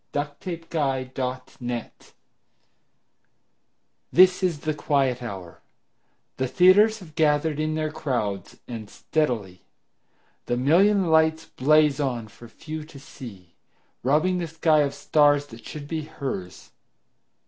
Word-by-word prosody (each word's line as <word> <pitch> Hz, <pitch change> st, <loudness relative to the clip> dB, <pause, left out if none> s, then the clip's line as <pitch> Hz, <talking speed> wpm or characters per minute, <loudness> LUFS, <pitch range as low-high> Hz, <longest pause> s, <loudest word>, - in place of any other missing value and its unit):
Sara 145 Hz, 0 st, -2 dB
Teasdale 160 Hz, -7 st, -2 dB
Broadway 125 Hz, -2 st, -4 dB, 2.2 s
THIS 185 Hz, +1 st, +6 dB
is 170 Hz, -6 st, 0 dB
the 155 Hz, -1 st, -1 dB
quiet 135 Hz, -4 st, 0 dB
hour; 95 Hz, -7 st, -8 dB, 0.8 s
the 130 Hz, -, 0 dB
theaters 185 Hz, -, +5 dB
Have 160 Hz, -4 st, -13 dB
gathered 150 Hz, 0 st, +1 dB
in 155 Hz, 0 st, -1 dB
their 155 Hz, -1 st, -2 dB
crowds, 120 Hz, -, -3 dB
and 115 Hz, -4 st, -7 dB
steadily 110 Hz, -, -2 dB, 0.9 s
The 120 Hz, -, 0 dB
million 180 Hz, +7 st, +3 dB
lights 160 Hz, 0 st, +3 dB
blaze 150 Hz, +2 st, +3 dB
on 120 Hz, -6 st, -2 dB
for 120 Hz, +3 st, -14 dB
few 155 Hz, +6 st, -8 dB
to 150 Hz, -2 st, -13 dB
see, 100 Hz, -, -12 dB, 0.5 s
Robbing 155 Hz, +8 st, +2 dB
the 170 Hz, -, -3 dB
sky 160 Hz, -1 st, +2 dB
of 140 Hz, -1 st, +1 dB
stars 145 Hz, 0 st, +3 dB
that 115 Hz, -4 st, -14 dB
should 145 Hz, -2 st, -8 dB
be 160 Hz, +1 st, -3 dB
hers. 130 Hz, -, -6 dB
145 Hz, 120 wpm, -25 LUFS, 125-160 Hz, 2.2 s, THIS